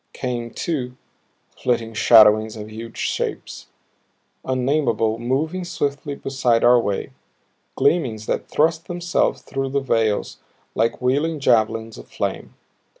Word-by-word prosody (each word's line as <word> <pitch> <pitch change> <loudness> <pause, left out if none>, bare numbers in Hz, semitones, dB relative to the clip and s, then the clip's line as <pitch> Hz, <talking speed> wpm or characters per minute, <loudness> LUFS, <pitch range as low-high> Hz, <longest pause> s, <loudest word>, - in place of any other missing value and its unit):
Came, 120 -2 -4
too, 125 -4 -4 0.6
flitting 115 -2 -1
shadowings 110 -1 +5
of 105 0 -8
huge 115 +1 -9
shapes, - - -3 0.8
unnameable, 125 -4 0
moving 150 +9 -1
swiftly 145 -4 -3
beside 130 -4 0
our 120 0 +6
way; 100 -4 -2 0.6
gleamings 120 -11 +1
that - - -3
thrust 160 +2 +1
themselves 175 0 -1
through 135 0 -3
the 140 +1 0
veils 115 -6 0 0.3
like 115 +3 0
wheeling 145 +5 +1
javelins 115 -3 +1
of - - -12
flame. - - -4
125 Hz, 115 wpm, -21 LUFS, 115-140 Hz, 0.8 s, our